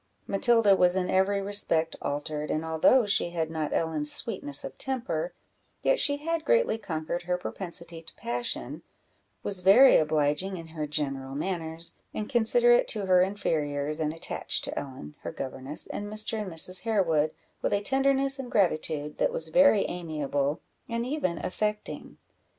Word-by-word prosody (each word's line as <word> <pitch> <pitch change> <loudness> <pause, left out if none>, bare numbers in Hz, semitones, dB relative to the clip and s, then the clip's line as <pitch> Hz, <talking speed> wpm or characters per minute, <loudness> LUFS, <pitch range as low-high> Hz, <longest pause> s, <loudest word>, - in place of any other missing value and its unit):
Matilda 215 0 +4
was 180 -1 +3
in 185 -1 -1
every 195 +1 +2
respect 180 -5 +1
altered, 150 +1 -3
and 155 +1 -2
although 160 +10 +4
she 200 -4 +1
had 165 -2 -3
not 155 -2 -3
Ellen's 155 -2 0
sweetness 165 -11 0
of - - -7
temper, 265 - -2 0.5
yet - - +3
she 285 0 +2
had 330 +2 -2
greatly 470 - +2
conquered 170 -3 -4
her 180 - +1
propensity 170 -2 -3
to 165 - -11
passion, 120 0 -4 0.6
was 195 -2 +1
very 215 +9 +7
obliging 155 +4 0
in 165 -1 -10
her 155 -2 -5
general 135 -3 -3
manners, 165 0 -3 0.2
and 210 - -3
considerate 485 - +5
to 210 - +1
her 185 -1 +4
inferiors, 155 -6 -1
and 155 -1 0
attached 165 - -2
to - - -2
Ellen, 130 - -9
her - - -6
governess, 135 +2 -5
and 205 - -6
Mr. 215 +1 -1
and 195 -3 -6
Mrs. 180 +3 +2
Harewood, 170 -9 +1 0.3
with - - -1
a 200 - +2
tenderness 270 +2 +2
and 250 -2 -6
gratitude 155 -6 0
that - - +2
was 160 0 -4
very 265 - +5
amiable 150 -3 -2 0.3
and 235 0 -2
even 250 - -2
affecting. 210 +2 -4
180 Hz, 155 wpm, -27 LUFS, 155-215 Hz, 0.6 s, very